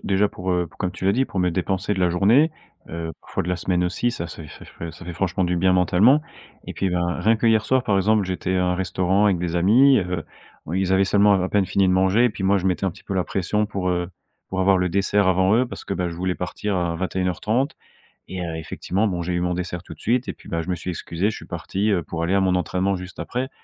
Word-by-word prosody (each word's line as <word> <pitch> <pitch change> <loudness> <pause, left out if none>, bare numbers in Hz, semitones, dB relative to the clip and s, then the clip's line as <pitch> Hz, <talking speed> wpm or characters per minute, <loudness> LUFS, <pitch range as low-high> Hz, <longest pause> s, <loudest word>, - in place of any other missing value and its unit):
déjà 100 +1 +3
pour, 95 -1 -5
heu, 90 -1 +1
pour - - -21
comme 90 - -1
tu - - -8
l'as 95 - +4
dit, 130 +4 +2
pour 100 - -6
me 90 -1 +2
dépenser 95 +3 -1
de 95 - -3
la 90 -1 +3
journée, 115 - +4 0.4
heu, 80 0 -5
parfois - - -4
de - - -5
la 90 - +1
semaine 90 0 0
aussi, 90 +7 0
ça 85 -8 -5
se 80 0 -9
fait 75 - -11
ça - - -12
fait 85 0 -8
ça 85 +3 -13
fait 85 - -6
franchement 90 +1 -1
du 90 0 0
bien 95 +2 +3
mentalement 95 - +4 0.5
et - - -5
puis, 95 -2 -1
ben, 85 0 -1
rien 110 +4 +3
que 115 - 0
hier 110 -1 +4
soir 130 -1 +1
par 100 - +2
exemple, 105 +1 +3
j'étais 95 0 -2
à 90 - +2
un 90 0 +1
restaurant 95 +2 +1
avec 95 -4 +2
des 85 -1 -3
amis, 120 +10 +5
heu, 90 -3 -3 0.4
bon, 80 - -6
ils 95 +1 0
avaient 95 +1 +4
seulement 100 +1 +4
à 90 - -1
peine 100 -1 +1
fini 95 +1 +2
de 90 - +3
manger, 95 +5 +3
et 120 - +3
puis 100 - -7
moi 100 +1 +3
je 95 - -2
mettais 95 +1 0
un 95 - +1
petit - - -16
peu 100 - -4
la 95 - +2
pression 100 +4 -1
pour, 95 -3 -2
heu, 90 0 -1 0.4
pour 95 - -4
avoir 95 +1 +4
le 90 0 +1
dessert 100 +2 +2
avant 95 +2 +3
eux, 120 +3 +3
parce 125 - -9
que, 100 - -3
bah, 90 -2 -1
je 85 - -7
voulais 90 +1 -1
partir 100 +3 -3
à 85 -2 -1
21:30 95 - -1 0.5
et 95 -1 -5
heu, 80 -1 -4
effectivement 95 +6 -2
bon, 90 -3 -2
j'ai 90 +1 -2
eu 90 - 0
mon 90 0 -1
dessert 90 -1 -4
tout - - -11
de - - -26
suite, 125 +3 0
et - - -3
puis, - - -17
bah, 85 0 -2
je 85 - -7
me 90 - 0
suis 90 +2 -5
excusé, 85 +4 -2
je - - -7
suis - - -10
parti, 100 +3 -2
heu, 95 -5 +1
pour 80 0 -5
aller 90 +3 +1
à - - +4
mon 95 -1 +2
entraînement 90 +2 0
juste 90 +1 -9
après. 130 +2 -3
95 Hz, 285 wpm, -23 LUFS, 90-100 Hz, 0.5 s, amis